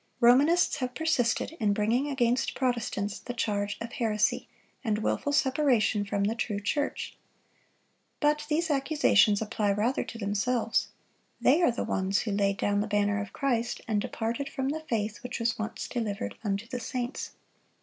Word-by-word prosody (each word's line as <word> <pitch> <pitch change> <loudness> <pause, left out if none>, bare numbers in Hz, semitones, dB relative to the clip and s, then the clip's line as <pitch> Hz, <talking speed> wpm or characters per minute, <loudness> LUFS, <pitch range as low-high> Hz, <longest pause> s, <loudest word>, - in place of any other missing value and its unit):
Romanists 280 +9 +5
have 255 -1 -3
persisted 310 -9 +1
in 210 -3 +2
bringing 225 +7 +1
against 250 -2 +1
Protestants 235 -5 -1
the 245 - -7
charge 205 -3 -1
of 230 0 -6
heresy, 215 -3 0 0.4
and 215 -4 +1
wilful 285 - 0
separation 260 -7 +2
from 200 0 -1
the 210 +2 +1
true 220 -3 -2
church. 285 +8 -2 1.0
But 300 0 +1
these 320 +1 +1
accusations 270 -8 +3
apply 210 -1 0
rather 225 +6 0
to 230 - -8
themselves. 225 +3 0 0.5
They 300 +7 +4
are 340 - +5
the 235 - -2
ones 190 +1 0
who 215 - -3
laid 200 -1 +1
down 205 0 +1
the 210 - -2
banner 205 -1 +1
of 200 - -7
Christ, 240 -4 -1
and 210 -2 +1
departed 230 +7 -3
from 265 0 -2
"the 310 +3 -2
faith 215 -3 -1
which 250 0 -5
was 230 -1 0
once 220 +1 -4
delivered 205 - -3
unto 200 +1 -1
the 245 +2 -5
saints." 245 +2 -4
230 Hz, 160 wpm, -28 LUFS, 205-260 Hz, 1.0 s, Romanists